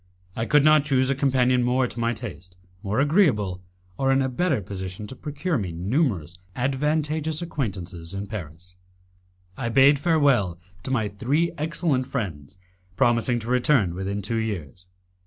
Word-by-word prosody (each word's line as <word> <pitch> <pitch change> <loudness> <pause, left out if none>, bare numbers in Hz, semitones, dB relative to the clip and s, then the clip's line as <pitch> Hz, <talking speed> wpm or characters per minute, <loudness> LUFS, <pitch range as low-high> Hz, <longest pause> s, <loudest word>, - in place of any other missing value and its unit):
I 115 0 -2
could 150 -1 +4
not 155 -1 +6
choose 135 -3 +2
a - - +1
companion 130 -2 +2
more 125 +1 +2
to 120 - -6
my 115 0 +1
taste, 95 -6 -9 0.2
more 105 +3 -1
agreeable, 135 - +2 0.4
or 135 0 +2
in 135 0 +3
a 130 - 0
better 145 +1 0
position 95 0 -6
to 130 - -9
procure 150 +2 -2
me 95 -4 -3
numerous 90 - -1 0.2
advantageous 150 +4 -1
acquaintances 95 - -5
in 100 +1 -4
Paris. 90 -4 -8 0.8
I 120 -2 -2
bade 135 +3 +5
farewell 140 - +2 0.2
to 130 - -6
my 115 -5 +1
three 130 +11 0
excellent 150 -4 -1
friends, 95 - -5 0.4
promising 120 +1 +2
to 110 - -8
return 125 - +2
within 95 +2 -3
two 115 +4 -2
years. 90 -6 -4
125 Hz, 155 wpm, -24 LUFS, 95-140 Hz, 0.8 s, not